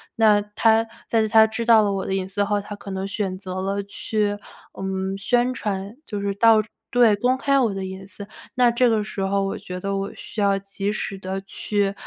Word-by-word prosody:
那 215 -2 +5
他 220 +2 +2 0.2
在 220 -1 +2
他 220 0 +7
知 220 +1 -3
道 225 -2 +7
了 200 -1 +1
我 195 -1 -2
的 190 - -1
隐 190 -1 -2
私 200 +1 0
后， 205 0 +1
他 205 +1 -8
可 200 0 -10
能 190 0 -3
选 195 -2 -2
择 185 -1 -5
了 200 +1 -1
去， 205 +1 -1 0.4
嗯， 190 0 -2
宣 245 +4 +2
传， 200 -2 -4
就 205 - -4
是 200 0 -1
到 220 +1 +5 0.3
对 240 -4 +5
公 250 +5 +1
开 275 +1 +2
我 230 -6 +2
的 190 -1 -3
隐 190 0 -8
私， 200 0 -7 0.3
那 250 -2 +4
这 240 +1 +3
个 220 -2 +2
时 205 -1 -5
候 195 +1 +1
我 195 - -2
觉 180 0 -7
得 195 +1 -2
我 195 +1 -3
需 215 - -6
要 200 -1 +3
及 195 +1 -3
时 210 -1 -3
地 190 +1 -4
去， 200 0 -1
205 Hz, 235 characters per minute, -23 LUFS, 195-220 Hz, 0.4 s, 他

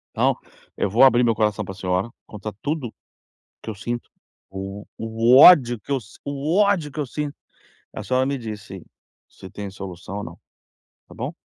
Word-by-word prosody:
Então, - - +2 0.4
eu 100 - 0
vou 120 +7 +4
abrir 125 -2 +6
meu 115 -2 +2
coração 105 -2 0
pra 95 - -7
senhora, 90 +3 -1 0.2
contar 105 0 -7
tudo 145 -5 -2 0.7
que - - -12
eu 110 - -3
sinto, 120 +4 -5 0.4
o 95 +1 -7
o 115 +2 +3
ódio 130 -8 +8
que - - -15
eu 135 -2 +1
si 105 -1 -17
o 140 +3 -2
ódio 200 -8 +2
que 155 - -4
eu 145 - -2
sinto, 150 +2 -4 0.6
a - - -6
senhora 130 0 +1
me 140 +1 -1
disse 110 -5 -7
se - - -19 0.6
se - - -10
tem 100 -1 -6
solução 95 0 -7
ou 105 - -4
não - - -10 0.7
tá - - -14
bom? - - -4
115 Hz, 190 wpm, -23 LUFS, 100-140 Hz, 0.7 s, ódio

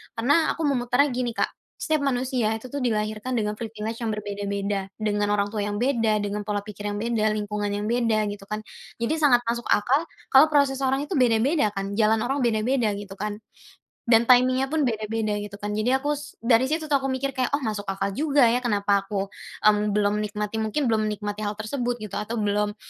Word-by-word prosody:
Karena 285 +8 +2
aku 325 - -4
memutarnya 265 0 +2
gini 245 -2 -2
Kak, - - 0 0.2
setiap 310 -2 0
manusia 250 -4 0
itu 240 +3 -9
tuh 285 - -3
dilahirkan 215 0 -1
dengan 210 -1 -1
privilege 225 0 -5
yang 225 -2 -2
berbeda-beda, 200 -1 -3
dengan 210 -1 0
orang 200 0 0
tua 215 - -3
yang 205 - -3
beda, 225 -3 +1
dengan 205 0 -4
pola 205 -1 -1
pikir 205 0 -7
yang 205 - -2
beda, 215 -1 0
lingkungan 210 0 -2
yang 205 +1 -3
beda, 230 -3 +2
gitu 200 -1 -10
kan. 215 0 -4 0.4
Jadi 315 +7 0
sangat 245 -5 +4
masuk 235 +1 -2
akal, 275 +10 +2 0.2
kalau 275 +4 +8
proses 280 -3 +2
orang 270 +1 +1
itu 295 - -10
beda-beda 245 +2 +3
kan, 195 0 -3
jalan 220 0 +3
orang 270 +3 -1
beda-beda, 235 -2 +1
gitu 205 -1 -8
kan, 210 0 -2 0.7
dan 235 0 +4
timing-nya 255 +1 +5
pun 310 +1 0
beda 220 -4 -1
beda, 215 -1 -1
gitu 205 -1 -7
kan. 205 0 -5
Jadi 220 +5 +1
aku, 290 +2 0
s 295 0 -11
dari 235 +2 +4
situ 315 +2 -1
tuh 280 - +5
aku 270 - -2
mikir 270 +1 -1
kayak 255 -1 0
"Oh 285 - -4
masuk 210 -3 -3
akal 195 +1 -2
juga 285 +3 +2
ya, 245 - +2
kenapa 200 -4 +1
aku, 195 -1 -3 0.3
mmm, 210 -1 +3
belum 210 0 +2
menikmati, 210 +1 -3
mungkin 220 +6 -1
belum 215 -1 +1
menikmati 210 0 -4
hal 205 0 -2
tersebut," 240 +3 -2
gitu, 210 - -6
atau 220 +3 -4
belum, 210 -1 0
220 Hz, 205 wpm, -25 LUFS, 210-255 Hz, 0.7 s, kalau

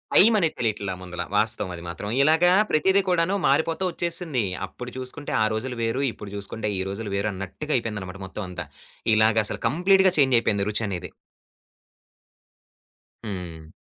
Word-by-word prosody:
టైమనేది 205 -6 +5
తెలియట్లా 105 -5 -1
ముందల 90 -1 -6
వాస్తవది 95 -5 0
మాత్రం. 100 +4 -5
ఇలాగా 160 +4 +5 0.2
ప్రతిది 190 +6 +4
కూడాను 180 +2 +2
మారిపోతూ 160 +6 +2
ఒచ్చేసింది. 170 - -2 0.2
అప్పుడు 125 +5 -8
చూసుకుంటే 130 +3 -5
ఆ - - +4
రోజులు 125 +3 -3
వేరు, 115 +5 0
ఇప్పుడు 105 -2 -10
చూసుకుంటే 105 +2 -3
ఈ - - 0
రోజులు 100 +1 -5
వేరన్నట్టుగా 100 +8 -3
అయిపోయిందనమాట 105 -5 -5
మొత్తమంతా 90 -3 -6 0.5
ఇలాగసలు 110 -1 +2
కంప్లీట్‌గా 185 +7 +4
చేంజయిపోయింది 115 -7 +3
రుచనేది. 100 -4 -3 2.1
హ్మ్. 85 -6 -7
110 Hz, 115 wpm, -25 LUFS, 100-155 Hz, 2.1 s, టైమనేది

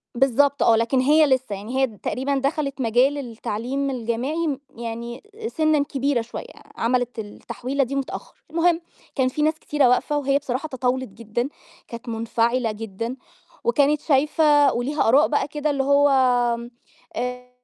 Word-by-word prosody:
بالضبط 275 +2 +3
آه، 230 - +5
لكن 230 +4 +1
هي 305 +4 +5
لسّه، 260 -6 +1
يعني 220 +7 -5
هي 265 - +4
تقريبًا 260 +5 -3
دخلت 275 -1 -1
مجال 250 +5 +3
التعليم 250 +2 -3
الجامعي 255 +7 -2
م 280 -3 -2 0.2
يعني 235 - -6 0.2
سِنًّا 310 -7 +2
كبيرة 280 -3 0
شوية، 230 - -7 0.3
عملِت 245 0 0
التحويلة 255 +6 -3
دي 275 +3 -5
متأخّر. 275 - -5 0.2
المهم 335 +1 +2 0.3
كان 260 -3 +2
في 300 - -3
ناس 310 0 +1
كتيرة 290 -4 +2
واقفة 290 +4 +2
وهي 275 -1 +2
بصراحة 270 +2 -3
تطاولت 260 -1 -1
جدًا، 230 +5 -3 0.4
كانت 235 +1 -8
منفعلة 230 +1 0
جدًا 225 +4 -5 0.5
وكانت 295 -9 +3
شايفة 295 0 +4
وليها 265 +2 0
آراء 280 +5 +5
بقى 290 - 0
كده 300 +1 -2
اللي 275 -1 0
هو، 280 +1 +4 1.1
آآ 250 +1 -4
265 Hz, 145 wpm, -23 LUFS, 235-285 Hz, 1.1 s, آه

